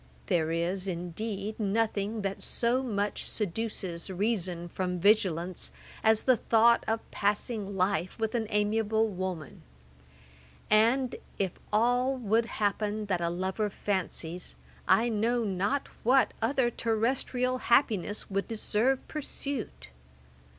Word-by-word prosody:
There 160 -2 +1
is, 180 +3 -1
indeed, 195 +4 -4
nothing 215 0 0
that 195 0 -3
so 240 +2 +2
much 210 -5 -2
seduces 200 -4 -3
reason 185 -3 -1
from 180 +1 -2
vigilance, 185 -3 +2 0.3
as 220 0 +4
the 255 -2 +4
thought 230 +1 +4
of 225 0 0
passing 205 0 -1
life 185 -1 0
with 220 -1 -1
an 230 -3 0
amiable 220 +1 +1
woman; 185 -5 -5 1.1
and 235 +4 +4 0.2
if 190 -3 0 0.2
all 245 +5 +3
would 225 -1 +1
happen 210 0 -1
that 180 -3 +1
a 170 - +1
lover 190 +4 -1
fancies, 180 - -3 0.3
I 230 - +5
know 230 +2 +1
not 200 +7 0
what 260 +3 +4
other 240 +1 +2
terrestrial 250 +3 0
happiness 215 -6 +2
would 195 0 -2
deserve 230 +3 0
pursuit. 275 - -5
210 Hz, 115 wpm, -29 LUFS, 190-230 Hz, 1.1 s, I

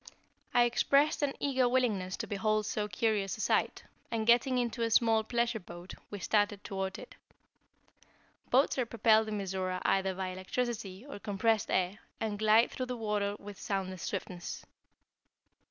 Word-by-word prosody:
I 240 - +5
expressed 280 +6 +3
an 285 -2 0
eager 260 -3 +2
willingness 215 -8 0
to - - -3
behold 215 +1 0
so 210 0 -2
curious 205 0 0
a - - -5
sight, - - +1 0.3
and 225 -2 -1
getting 245 +3 +4
into 240 -1 -1
a 230 - +1
small 225 -1 +4
pleasure 235 0 0
boat, 175 0 -10 0.2
we 205 - -5
started 205 +1 +1
toward 190 -1 -3
it. - - -11 1.4
Boats 265 +1 +3
are 250 - +2
propelled 220 -1 +3
in 215 -1 -2
Mizora 185 -2 -2
either 190 -1 +2
by 190 0 -3
electricity 200 +2 -4
or 280 - -8
compressed 210 +2 0
air, 185 +2 0 0.2
and 210 -2 -2
glide 220 +2 +5
through 255 - -4
the 250 -1 -4
water 210 -2 -1
with 205 -1 -10
soundless 190 -2 -3
swiftness. 180 -3 -5
215 Hz, 155 wpm, -31 LUFS, 195-235 Hz, 1.4 s, I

